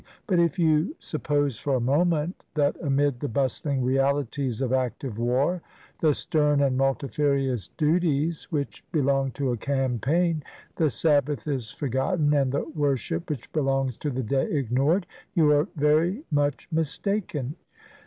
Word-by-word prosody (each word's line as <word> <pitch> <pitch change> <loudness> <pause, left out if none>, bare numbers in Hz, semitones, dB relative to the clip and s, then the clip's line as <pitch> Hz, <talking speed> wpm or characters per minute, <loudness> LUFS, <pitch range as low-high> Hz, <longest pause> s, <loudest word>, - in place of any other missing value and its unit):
But 185 -6 +2
if 170 +2 +2
you 160 - +2
sup 155 - -6
pose 145 -5 0
for 140 -2 0
a - - +1
moment 155 +6 +1
that 145 -2 +2
amid 140 -3 +1
the 145 - -2
bustling 135 +2 -1
realities 135 -1 0
of 130 -1 0
active 130 -2 -2
war, 135 +9 +1 0.4
the 155 -3 +3
stern 150 -2 +1
and 135 -2 +2
multifarious 135 - 0
duties 160 0 +1
which 145 -3 -3
be 160 - +1
long 135 -1 +2
to 135 -3 -1
a 120 - -1
campaign, 140 - 0 0.3
the 160 -2 +2
Sabbath 145 -4 +1
is 130 -6 -2
forgotten, 145 - 0
and 135 -3 +2
the 140 - 0
worship 155 +2 -1
which 145 -6 -5
belongs 135 -4 0
to 150 - -3
the 130 -1 -2
day 135 +5 0
ignored, 140 - +1 0.3
you 155 -3 +5
are 150 +3 +3
very 160 - +2
much 145 -4 0
mistaken. 160 - -1
145 Hz, 150 wpm, -26 LUFS, 135-155 Hz, 0.4 s, you